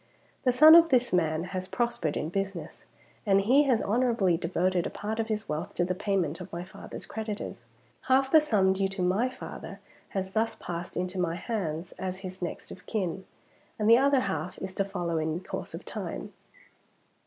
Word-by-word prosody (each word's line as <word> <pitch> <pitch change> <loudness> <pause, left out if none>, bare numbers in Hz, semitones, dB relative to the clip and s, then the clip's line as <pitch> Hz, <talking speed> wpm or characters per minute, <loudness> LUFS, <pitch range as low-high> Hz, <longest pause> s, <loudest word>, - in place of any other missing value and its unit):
The 250 - +5
son 305 +6 +9
of 335 0 +8
this 250 -4 +2
man 160 -2 +2
has 185 0 -3
prospered 235 -11 -1
in 155 - -2
business, 195 -1 -4 0.4
and 195 -2 +4
he 265 +8 +4
has 250 -5 +2
honorably 225 -5 +2
devoted 180 +1 0
a - - -4
part 220 +2 -4
of 225 - 0
his 215 -1 -2
wealth 150 +1 -4
to 175 - +1
the 185 - -1
payment 185 -5 -1
of - - -8
his 175 +2 -7
father's - - -8
creditors. 210 - -5 0.4
Half 265 +1 +3
the 315 - +8
sum 205 -10 +3
due 195 0 +1
to 195 -1 -3
my 195 +8 +2
father 255 - -8 0.3
has 190 -1 -3
thus 220 +3 0
passed 175 0 -6
into 185 +1 -2
my 170 -2 0
hands 175 -6 -3
as 185 0 -4
his 185 0 -7
next 175 - -5
of - - -11
kin; 190 -3 -2 0.5
and 215 - 0
the 230 +2 +8
other 275 -1 +4
half 190 -3 -3
is 190 0 -5
to 195 - +1
follow 175 -4 -2
in 160 +1 -1
course - - -5
of - - -9
time. - - -5
190 Hz, 190 wpm, -28 LUFS, 180-225 Hz, 0.5 s, son